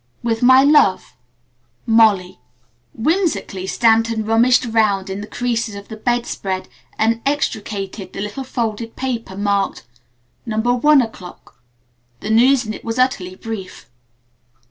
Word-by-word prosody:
"With 225 Hz, -1 st, -1 dB
my 260 Hz, +2 st, +6 dB
love, 285 Hz, -10 st, +3 dB, 0.7 s
"MOLLY." 210 Hz, -, +3 dB, 0.5 s
Whimsically, 225 Hz, -, -1 dB
Stanton 225 Hz, 0 st, +2 dB
rummaged 235 Hz, +3 st, +3 dB
around 210 Hz, -4 st, +1 dB
in 195 Hz, +1 st, -5 dB
the 210 Hz, -, -8 dB
creases 230 Hz, -2 st, -2 dB
of 200 Hz, 0 st, -10 dB
the 220 Hz, -, -7 dB
bed 240 Hz, +2 st, -1 dB
spread 190 Hz, -1 st, -4 dB, 0.3 s
and 230 Hz, +1 st, +1 dB
extricated 205 Hz, -8 st, -3 dB
the -, -, -6 dB
little 210 Hz, +6 st, -5 dB
folded 230 Hz, -3 st, -4 dB
paper 235 Hz, -7 st, -4 dB
marked, 200 Hz, -, -1 dB, 0.6 s
"No. 220 Hz, -2 st, -4 dB
1 245 Hz, +5 st, +4 dB
o'clock." 180 Hz, -, -11 dB, 0.6 s
The 215 Hz, -, -4 dB
news 250 Hz, +3 st, +4 dB
in 215 Hz, -, -4 dB
it -, -, -10 dB
was 225 Hz, +1 st, -4 dB
utterly 200 Hz, -8 st, 0 dB
brief. 190 Hz, -, -8 dB
225 Hz, 130 wpm, -19 LUFS, 200-245 Hz, 0.7 s, my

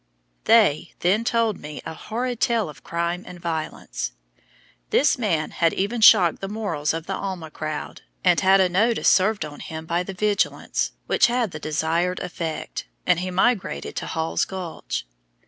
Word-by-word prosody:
They 200 Hz, -8 st, +4 dB
then 195 Hz, +6 st, +2 dB
told 230 Hz, -3 st, +1 dB
me 150 Hz, 0 st, -7 dB
a -, -, -5 dB
horrid 240 Hz, +7 st, -4 dB
tale 230 Hz, -7 st, +1 dB
of 150 Hz, -, -13 dB
crime 170 Hz, +2 st, -2 dB
and 175 Hz, -, -9 dB
violence. 165 Hz, -2 st, -4 dB, 0.8 s
This 285 Hz, -1 st, +3 dB
man 170 Hz, -9 st, 0 dB
had 165 Hz, -1 st, +1 dB
even 215 Hz, +4 st, -1 dB
shocked 190 Hz, -6 st, +7 dB
the 195 Hz, -, -3 dB
morals 185 Hz, -9 st, -1 dB
of 165 Hz, 0 st, -4 dB
the 195 Hz, -, -3 dB
Alma 185 Hz, -5 st, -5 dB
crowd, 155 Hz, 0 st, -5 dB, 0.2 s
and 180 Hz, -2 st, +4 dB
had 190 Hz, 0 st, +5 dB
a 190 Hz, -, +5 dB
notice 220 Hz, +6 st, +2 dB
served 200 Hz, -2 st, +3 dB
on 145 Hz, -1 st, -9 dB
him 160 Hz, 0 st, -7 dB
by 170 Hz, +2 st, 0 dB
the 190 Hz, +1 st, -6 dB
vigilants, 205 Hz, +1 st, 0 dB
which -, -, +4 dB
had 240 Hz, -4 st, 0 dB
the 155 Hz, -, -6 dB
desired 160 Hz, +4 st, 0 dB
effect, 170 Hz, -3 st, -5 dB, 0.2 s
and 180 Hz, -2 st, +3 dB
he 185 Hz, +1 st, -3 dB
migrated 185 Hz, -, 0 dB
to -, -, -3 dB
Hall's 80 Hz, +1 st, -1 dB
Gulch. 185 Hz, -, -5 dB
180 Hz, 165 wpm, -23 LUFS, 160-210 Hz, 0.8 s, shocked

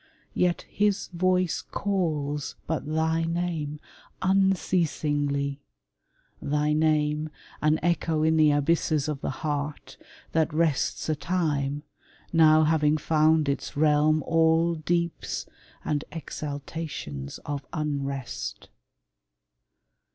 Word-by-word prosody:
Yet 180 Hz, -1 st, +1 dB
his 205 Hz, -1 st, 0 dB
voice 180 Hz, 0 st, +1 dB
Calls 155 Hz, -8 st, -2 dB
but 160 Hz, -2 st, -2 dB
thy 160 Hz, +1 st, +1 dB
name 165 Hz, -3 st, -2 dB, 0.4 s
unceasingly 150 Hz, -7 st, +1 dB, 0.4 s
— -, -, -42 dB
thy 150 Hz, +1 st, +1 dB
name, 155 Hz, 0 st, +1 dB, 0.3 s
An 155 Hz, +1 st, +3 dB
echo 165 Hz, -2 st, +1 dB
in 160 Hz, 0 st, +3 dB
the 155 Hz, -1 st, +5 dB
abysses 150 Hz, 0 st, +1 dB
of 150 Hz, -3 st, -3 dB
the -, -, -2 dB, 0.2 s
heart, 145 Hz, 0 st, -3 dB, 0.3 s
That 160 Hz, 0 st, +1 dB
rests 155 Hz, -2 st, 0 dB
a 155 Hz, -, +1 dB
time, 145 Hz, -4 st, -1 dB, 0.5 s
now 155 Hz, -1 st, +6 dB
having 155 Hz, -1 st, +3 dB
found 155 Hz, 0 st, +3 dB
its 140 Hz, 0 st, -2 dB
realm 155 Hz, +1 st, +3 dB
All 165 Hz, +1 st, +3 dB
deeps 170 Hz, +1 st, -2 dB, 0.4 s
and 150 Hz, -1 st, 0 dB
exaltations 145 Hz, -, -6 dB
of 145 Hz, -2 st, -4 dB
unrest. 140 Hz, -4 st, -4 dB
155 Hz, 100 wpm, -26 LUFS, 145-165 Hz, 0.5 s, now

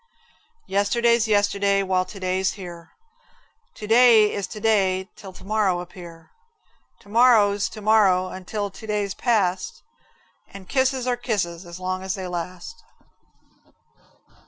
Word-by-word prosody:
Yesterday's 235 Hz, +3 st, +1 dB
yesterday 200 Hz, -1 st, +1 dB
while 185 Hz, -1 st, 0 dB
to 195 Hz, -, -11 dB
day's 185 Hz, +1 st, -1 dB
here, 175 Hz, -4 st, -10 dB, 0.9 s
To 210 Hz, -, -8 dB
day 225 Hz, -1 st, +5 dB
is 200 Hz, -2 st, -3 dB
to 215 Hz, -, -9 dB
day 195 Hz, -4 st, +1 dB
till 195 Hz, -, -11 dB
to -, -, -15 dB
morrow 200 Hz, -3 st, 0 dB
appear, 175 Hz, -2 st, -11 dB, 0.7 s
To 200 Hz, -, -19 dB
marrow's 210 Hz, -3 st, +4 dB
to 215 Hz, -, -10 dB
morrow 200 Hz, -4 st, +3 dB
until 200 Hz, +2 st, -5 dB
to 220 Hz, +4 st, -12 dB
day's 205 Hz, -2 st, -2 dB
past, 200 Hz, -7 st, -1 dB, 0.7 s
And 195 Hz, -2 st, -12 dB
kisses 260 Hz, 0 st, 0 dB
are 250 Hz, -1 st, 0 dB
kisses 185 Hz, -8 st, -3 dB
as 170 Hz, +1 st, -9 dB
long 185 Hz, 0 st, -3 dB
as 190 Hz, 0 st, -3 dB
they 190 Hz, -2 st, -6 dB
last. 180 Hz, -, -7 dB
200 Hz, 135 wpm, -23 LUFS, 185-220 Hz, 0.9 s, day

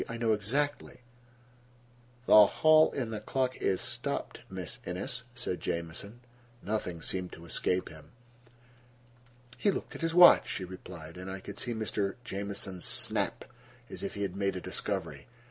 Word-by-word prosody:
I 115 Hz, -, -4 dB
know 115 Hz, -1 st, +2 dB
exactly." 135 Hz, +8 st, -1 dB, 1.2 s
"The -, -, +4 dB
clock 155 Hz, +5 st, +5 dB
in 120 Hz, -4 st, -2 dB
the 110 Hz, -, -3 dB
hall 130 Hz, -2 st, 0 dB
is 95 Hz, -, +1 dB
stopped, -, -, -3 dB
Miss -, -, -5 dB
Innes," 95 Hz, +7 st, -4 dB
said 120 Hz, -8 st, -3 dB
Jamieson. 85 Hz, +8 st, -4 dB, 0.4 s
Nothing 90 Hz, -6 st, -3 dB
seemed 90 Hz, -1 st, -2 dB
to 85 Hz, -, -11 dB
escape 90 Hz, +2 st, -1 dB
him. 80 Hz, -2 st, -13 dB, 1.5 s
"He 205 Hz, -, +3 dB
looked 195 Hz, -, -2 dB
at -, -, -8 dB
his 165 Hz, 0 st, 0 dB
watch," 175 Hz, 0 st, +8 dB
she 95 Hz, -, -3 dB
replied, 90 Hz, -3 st, -10 dB
and 95 Hz, +1 st, -7 dB
I 95 Hz, 0 st, -5 dB
could -, -, -7 dB
see 120 Hz, -2 st, -2 dB
Mr. 105 Hz, -2 st, -1 dB
Jamieson's 100 Hz, -4 st, -4 dB
snap, -, -, +1 dB, 0.5 s
as -, -, -6 dB
if -, -, -4 dB
he 100 Hz, -, -2 dB
had 95 Hz, -2 st, -3 dB
made 100 Hz, -1 st, 0 dB
a -, -, -2 dB
discovery. -, -, -4 dB
100 Hz, 155 wpm, -31 LUFS, 90-120 Hz, 1.5 s, watch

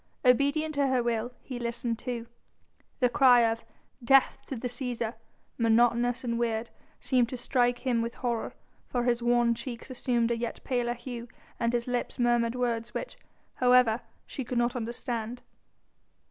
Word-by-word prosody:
Obedient 285 Hz, +5 st, +3 dB
to 285 Hz, -1 st, +2 dB
her 255 Hz, -2 st, +2 dB
will 235 Hz, 0 st, -1 dB
he 255 Hz, -2 st, -6 dB
listened 235 Hz, -1 st, -2 dB
too. 240 Hz, -2 st, -4 dB, 0.8 s
The 250 Hz, -, +6 dB
cry 245 Hz, -1 st, +6 dB
of 230 Hz, 0 st, +1 dB, 0.4 s
"Death 270 Hz, +2 st, +4 dB
to 270 Hz, -, -4 dB
the 245 Hz, +1 st, -3 dB
Cæsar!" 240 Hz, -2 st, -3 dB, 0.5 s
monotonous 235 Hz, +2 st, +3 dB
and 235 Hz, -1 st, -1 dB
weird, 230 Hz, -1 st, -1 dB, 0.3 s
seemed 250 Hz, -3 st, +2 dB
to 255 Hz, -, -5 dB
strike 245 Hz, 0 st, +1 dB
him 240 Hz, -3 st, +2 dB
with 230 Hz, 0 st, -3 dB
horror, 235 Hz, -3 st, -2 dB, 0.3 s
for 245 Hz, -1 st, -1 dB
his 240 Hz, -1 st, +1 dB
wan 240 Hz, 0 st, +3 dB
cheeks 235 Hz, +2 st, -7 dB
assumed 240 Hz, -2 st, 0 dB
a -, -, +2 dB
yet 235 Hz, 0 st, -4 dB
paler 245 Hz, -2 st, 0 dB
hue 240 Hz, 0 st, -7 dB, 0.3 s
and 235 Hz, -1 st, +1 dB
his 240 Hz, -1 st, 0 dB
lips 245 Hz, -1 st, -2 dB
murmured 240 Hz, -1 st, +2 dB
words 235 Hz, -2 st, -2 dB
which, -, -, -4 dB, 0.4 s
however, 250 Hz, -2 st, +4 dB, 0.2 s
she 270 Hz, -, -5 dB
could 245 Hz, +1 st, -3 dB
not 240 Hz, +1 st, +1 dB
understand. 235 Hz, 0 st, -4 dB
240 Hz, 160 wpm, -29 LUFS, 235-250 Hz, 0.8 s, The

